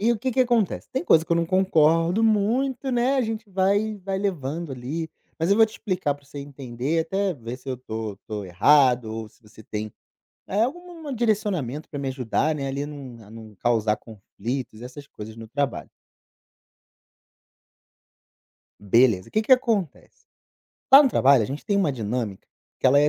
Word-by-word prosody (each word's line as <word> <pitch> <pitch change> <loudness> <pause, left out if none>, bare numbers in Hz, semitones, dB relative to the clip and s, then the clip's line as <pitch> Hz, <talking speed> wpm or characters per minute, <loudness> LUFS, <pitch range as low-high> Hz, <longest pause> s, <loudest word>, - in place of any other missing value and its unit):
E 235 +3 +3
o 225 - -3
que 260 +4 -1
que 255 +2 +1
acontece, 235 -6 +1
tem 265 +7 -1
coisa 160 - +5
que 170 - -2
eu - - +3
não 170 - +2
concordo 170 +1 +3
muito, 235 +5 +1
né, 250 +3 +2
a 265 - +3
gente 220 -2 -4
vai 200 +3 +1
vai 195 -1 -2
levando 170 -5 -3
ali, 145 +6 -5 0.3
mas 165 +3 0
eu 200 - +5
vou 225 -1 +6
te 215 - -15
explicar 180 -10 -2
para 145 0 -20
você 145 +1 -10
entender, 140 +2 -3
até 190 +3 -1
ver 120 -1 -7
se 130 +1 -13
eu 130 - -2
tô 110 -4 -6
tô 105 -3 -5
errado 125 +6 +4
ou 110 -1 -5
se 115 - -29
você 110 +1 -17
tem, 105 0 -5 0.5
eh, 205 +3 +1
alguma 330 +2 -4
direcionamento 200 - -1
para 145 - -5
me 140 - -2
ajudar, 130 +4 0
né, 140 -2 -3
ali 140 +2 -3
num 130 -6 -10
a 105 - -16
não 110 -2 -12
causar 110 -1 +1
conflitos 115 +2 -6
e - - -8
essas 140 +3 -10
coisas 110 +1 -10
no 115 -1 -10
trabalho. 140 +2 -2 2.9
Beleza, 105 -2 +3
que 215 - +1
que 240 - -2
acontece, 225 - +1 0.7
lá 275 +2 +11
no 270 - +3
trabalho, 135 - +4
a - - -1
gente 140 +5 -6
tem 200 - +1
uma 185 -8 +2
dinâmica 110 -4 -4 0.3
que - - +2
ela 140 +2 +6
é 150 - +5
145 Hz, 185 wpm, -24 LUFS, -, 2.9 s, lá